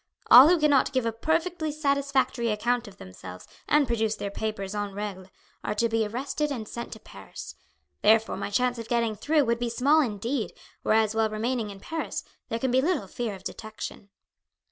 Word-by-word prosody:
All 255 +4 +11
who 350 -1 +4
cannot 290 -3 +3
give 255 -3 +1
a 230 - +1
perfectly 320 +6 -1
satisfactory 280 -4 0
account 235 +3 0
of 195 -1 -13
themselves 95 0 -10 0.2
and 295 -1 +4
produce 225 -3 0
their 200 - -5
papers 200 -2 -4
en 205 -1 -3
regle, 200 -3 -5 0.4
are 210 - -2
to 230 +2 +2
be 225 -1 0
arrested 275 +6 -2
and 225 -6 -4
sent 235 +2 -6
to 220 - -11
Paris. 95 - -10 0.5
Therefore, 225 0 +4
my 200 +1 -4
chance 245 +3 +1
of 230 - -6
getting 235 -2 +1
through 295 +7 +2
would 235 0 0
be 240 -1 -1
small 275 +7 +4
indeed, 230 0 -2 0.3
whereas 220 -1 +2
while 220 0 +2
remaining 225 +1 -2
in 200 -1 -9
Paris 320 +10 -4 0.3
there 230 - -1
can 255 +2 -1
be 260 +1 +4
little 300 - 0
fear 220 +1 -4
of 190 - -13
detection." 215 -1 -7
230 Hz, 190 wpm, -27 LUFS, 210-270 Hz, 0.5 s, All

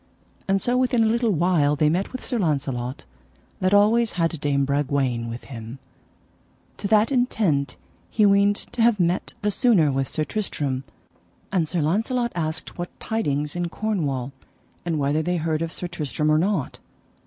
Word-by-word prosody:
And 195 0 +2
so 245 +5 +1
within 250 -2 +2
a - - +3
little 235 +1 +1
while 165 -5 +2
they 150 +1 +2
met 175 +6 0
with 255 - -6
Sir 245 -3 -1
Launcelot 135 - -2 0.6
that 185 0 +1
always 215 +3 +4
had 165 -3 -1
Dame 140 -2 +1
Bragwaine 135 -4 0
with 115 +1 -7
him, 115 -1 -8 1.0
to 200 - -3
that 215 +4 +3
intent 210 - +1 0.3
he 215 - +3
weened 200 0 +4
to 235 - -4
have 230 -2 +4
met 175 +1 0
the 210 - +2
sooner 200 - +3
with 135 0 -1
Sir 155 - -2
Tristram; 145 -9 -3 0.7
and 175 -5 +1
Sir 175 -3 0
Launcelot 230 - 0
asked 160 0 -4
what 175 - -6
tidings 150 -10 -2
in 175 -1 -2
Cornwall, 150 - -2 0.5
and 165 -2 -1
whether 145 +2 +1
they 175 +2 -1
heard 160 -1 -1
of 165 0 -2
Sir 180 - -6
Tristram 155 -2 -1
or 155 - +4
not. 180 -6 -1
170 Hz, 165 wpm, -24 LUFS, 145-210 Hz, 1.0 s, always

